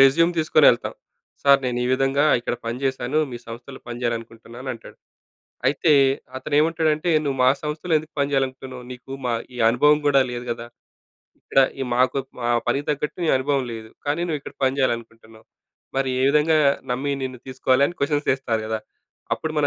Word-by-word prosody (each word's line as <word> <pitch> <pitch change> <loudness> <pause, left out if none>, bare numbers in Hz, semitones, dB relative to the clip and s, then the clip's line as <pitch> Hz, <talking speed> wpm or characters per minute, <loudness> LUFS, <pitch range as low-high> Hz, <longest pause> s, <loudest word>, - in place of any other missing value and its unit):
Resume 165 +6 +5
తీసుకొని 155 - +4
వెళ్తాం. - - -2 0.5
"Sir 140 -1 +6
నేను 125 -1 -1
ఈ - - 0
విధంగా 135 +2 +2 0.2
ఇక్కడ 120 - -2
పని 120 +2 -3
చేశాను, 130 +2 0
మీ 120 - -6
సంస్థలో 120 +4 -9
పని 120 0 -6
చేయాలనుకుంటున్నాను" 115 +2 -5
అంటాడు. 115 - -13 0.7
అయితే 150 +3 +2 0.5
అతనేమంటాడంటే, 155 +3 +1 0.2
"నువ్వు 135 -2 -1
మా - - +7
సంస్థలో 155 +3 -2
ఎందుకు 155 +1 -8
పని 140 0 +1
చేయాలనుకుంటున్నావు? 130 -2 -2
నీకు 125 +1 -10
మా 120 - +1 0.2
ఈ - - -7
అనుభవం 150 +5 +4
కూడా 140 -2 +5
లేదు 120 0 -5
కదా. 115 0 -5 0.8
ఇక్కడ 135 - +2 0.2
ఈ - - 0
మాకు 130 +2 +2 0.2
మా 120 - -1 0.2
పనికి 140 +1 0
తగ్గట్టు 150 +3 -3
నీ - - 0
అనుభవం 135 0 0
లేదు. 110 -1 -8 0.2
కానీ 150 +4 0
నువ్విక్కడ 150 -4 -4
పని 130 +1 +1
చేయాలనుకుంటున్నావు. 115 -3 -3 0.5
మరి 135 -1 +1
ఏ - - +2
విధంగా 150 +2 +3 0.3
నమ్మి 140 +3 -1
నిన్ను 130 -2 -6
తీసుకోవాలి?" 130 +1 +2
అని 175 - -10
క్వశ్చన్స్ 145 +1 0
వేస్తారు 120 -5 -2
కదా. 110 0 -2 0.5
అప్పుడు 160 - -4
మన 145 - +3
135 Hz, 170 wpm, -23 LUFS, 120-150 Hz, 0.8 s, మా